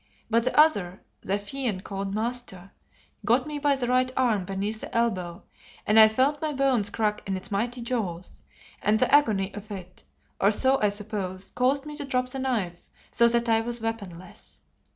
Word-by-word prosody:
But 230 +1 +3
the 295 - +2
other, 200 - +3 0.2
the 195 +2 -1
fiend 205 -2 -4
called 195 0 -4
Master, 220 -5 -4 0.5
got 245 +3 +2
me 300 -1 -5
by 285 -1 +2
the 260 -2 -2
right 255 +1 +2
arm 225 -7 +2
beneath 200 +3 -3
the - - -4
elbow, 185 -6 -1 0.4
and 215 +1 +5
I 220 - +10
felt 265 +7 +1
my 310 -1 -1
bones 260 -7 +1
crack 210 0 -1
in 190 - 0
its 190 +3 -8
mighty 240 +5 -2
jaws, 195 -8 -4 0.4
and 215 +1 +3
the - - +1
agony 210 -9 +3
of 205 +1 -9
it, 185 -3 -9 0.4
or 200 - +4
so 265 +5 +2
I 210 - +4
suppose, 200 -2 -5
caused 270 +3 +1
me 300 0 -7
to 295 - -4
drop 255 -2 -1
the 265 - -4
knife, 215 -10 -3 0.2
so 235 - +4
that 235 0 +2
I 225 -1 +3
was 240 +1 -4
weaponless. 200 -6 -7
225 Hz, 185 wpm, -26 LUFS, 195-255 Hz, 0.5 s, I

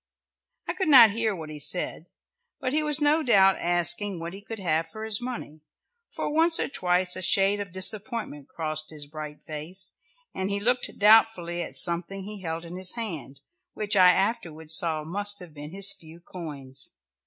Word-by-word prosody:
I - - -2
could 380 - -2
not 250 -7 +8
hear 220 -1 -1
what 160 -3 -9
he 150 - -9
said, 170 +2 -1 0.5
but 255 - -3
he 310 - +3
was 300 -1 0
no 300 +2 +3
doubt 195 -8 +4
asking 175 +2 +1
what 170 +1 -7
he 195 - -10
could 225 +2 -8
have 165 -4 -1
for 220 0 -9
his 220 0 +1
money, 240 -11 -7 0.5
for - - -5
once 330 +1 +3
or - - +1
twice 180 -6 0
a 185 - -5
shade 195 +2 +3
of 200 -3 -6
disappointment 195 - -2
crossed 155 -1 -3
his 150 -2 -5
bright 150 0 -9
face, 165 +5 -5 0.4
and 190 +1 -3
he 200 0 -1
looked 245 +4 +1
doubtfully 205 -5 +3
at - - -7
something 180 +3 0
he 205 0 -9
held 165 -1 -5
in 170 +2 -9
his 185 -1 +1
hand, 160 - -6 0.3
which 210 0 0
I 185 -2 +7
afterwards 165 -6 -1
saw 160 -4 +3
must 205 +5 -1
have 180 -5 -11
been 150 0 -9
his 200 +3 +5
few 165 -3 -15
coins. 140 -7 -6
185 Hz, 185 wpm, -25 LUFS, 160-215 Hz, 0.5 s, not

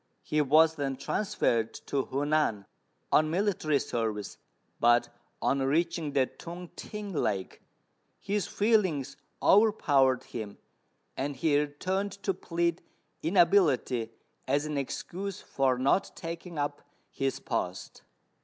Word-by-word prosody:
He 150 - +1
was 155 +3 +5
then 135 -2 -1
transferred 130 - 0
to 135 -2 -1
Hu 140 +2 -2
nan, 145 -10 +1 0.5
on 155 0 +4
military 170 -4 +1
service; 110 -6 -3 0.4
but, 120 +1 +4 0.3
on 140 - +2
reaching 155 +2 0
the 135 -2 +4
Tung 175 +5 -9
t'ing 210 -2 -6
lake, 100 - -2 0.6
his 200 0 -1
feelings 185 - +1 0.3
overpowered 145 - +4
him, 105 -3 -7 0.6
and 140 +2 -2
he 145 +3 +1
returned 185 +7 -2
to 195 - +1
plead 170 -1 -1 0.4
inability 160 - +3 0.4
as 140 +3 +1
an 150 -1 -3
excuse 180 +7 -4
for 130 -2 0
not 135 +9 +1
taking 170 0 -7
up 145 0 -2 0.3
his 135 -1 -2
post. - - -4
150 Hz, 115 wpm, -29 LUFS, 135-180 Hz, 0.6 s, was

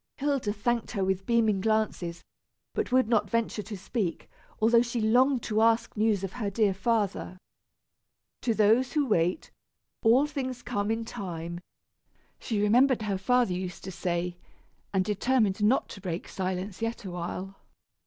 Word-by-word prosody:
Hilda 275 -6 0
thanked 230 +3 -1
her 200 -4 0
with 190 0 -1
beaming 220 -4 +2
glances, 215 -5 -1 0.5
but - - -2
would 255 -2 +4
not 210 -3 +2
venture 230 -1 0
to 210 0 -7
speak, 190 -3 -3 0.3
although 230 +2 +5
she 240 0 -2
longed 245 +3 +3
to 215 0 0
ask 230 0 +2
news 210 -2 +1
of 195 - -4
her 220 -5 -2
dear 200 -1 +2
father. 200 -2 -1 1.0
"To 230 -3 0
those 225 +5 +3
who 300 -2 +2
wait, 180 -6 0 0.5
all 245 +6 +5
things 260 -4 -4
come 205 -4 -2
in 225 0 -1
time," 170 -5 -5 0.8
she 220 -3 -2
remembered 240 +4 +4
her 200 -3 -1
father 245 0 +2
used 180 0 -5
to 190 - -6
say, 175 0 -2 0.5
and 190 -2 +1
determined 210 0 +1
not 230 +6 +3
to 195 - -9
break 180 -2 -4
silence 185 +2 -4
yet 225 -1 -3
a 185 - -5
while. 180 +2 -5
215 Hz, 155 wpm, -28 LUFS, 190-235 Hz, 1.0 s, although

